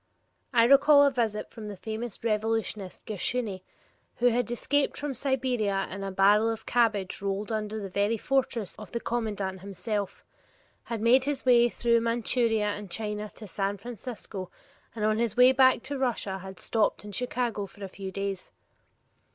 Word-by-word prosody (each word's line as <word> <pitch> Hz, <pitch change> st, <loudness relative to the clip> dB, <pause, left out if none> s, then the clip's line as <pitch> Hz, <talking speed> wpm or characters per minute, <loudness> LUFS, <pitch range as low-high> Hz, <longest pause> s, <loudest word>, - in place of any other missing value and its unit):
I 235 Hz, -3 st, +5 dB
recall 285 Hz, +3 st, +7 dB
a 280 Hz, -, +4 dB
visit 225 Hz, -5 st, -1 dB
from 220 Hz, -3 st, -8 dB
the 205 Hz, -2 st, -7 dB
famous 220 Hz, +2 st, -6 dB
revolutionist 215 Hz, -3 st, -2 dB
Gershuni, 215 Hz, -1 st, -2 dB, 0.5 s
who 245 Hz, +1 st, +4 dB
had 240 Hz, -1 st, 0 dB
escaped 280 Hz, +4 st, 0 dB
from 290 Hz, -1 st, -3 dB
Siberia 245 Hz, -7 st, 0 dB
in 195 Hz, +1 st, -5 dB
a 195 Hz, -, -3 dB
barrel 205 Hz, +4 st, +4 dB
of 225 Hz, -1 st, -4 dB
cabbage 215 Hz, -7 st, +1 dB
rolled 200 Hz, +2 st, -2 dB
under 215 Hz, 0 st, -2 dB
the 200 Hz, -, -5 dB
very 200 Hz, +4 st, 0 dB
fortress 250 Hz, -4 st, -1 dB
of 215 Hz, -, -10 dB
the 235 Hz, -, -1 dB
commandant 205 Hz, -6 st, -2 dB
himself, 200 Hz, +1 st, -4 dB, 0.6 s
had 230 Hz, -2 st, -4 dB
made 250 Hz, +4 st, +5 dB
his 285 Hz, -2 st, -2 dB
way 240 Hz, -1 st, +6 dB
through 235 Hz, 0 st, +2 dB
Manchuria 230 Hz, -1 st, +1 dB
and 205 Hz, -1 st, -5 dB
China 210 Hz, +1 st, -4 dB
to 220 Hz, -, -9 dB
San 200 Hz, +1 st, -2 dB
Francisco, 220 Hz, -4 st, -7 dB, 0.5 s
and 215 Hz, -2 st, -1 dB
on 215 Hz, 0 st, +2 dB
his 235 Hz, -2 st, -1 dB
way 250 Hz, +1 st, +8 dB
back 260 Hz, -2 st, +4 dB
to 280 Hz, 0 st, -4 dB
Russia 220 Hz, -7 st, -1 dB
had 190 Hz, 0 st, -9 dB
stopped 220 Hz, -2 st, 0 dB
in 205 Hz, -, -7 dB
Chicago 240 Hz, -2 st, -2 dB
for 205 Hz, -, -12 dB
a -, -, -3 dB
few 190 Hz, 0 st, -7 dB
days. 195 Hz, -1 st, -4 dB
220 Hz, 165 wpm, -28 LUFS, 200-240 Hz, 0.6 s, way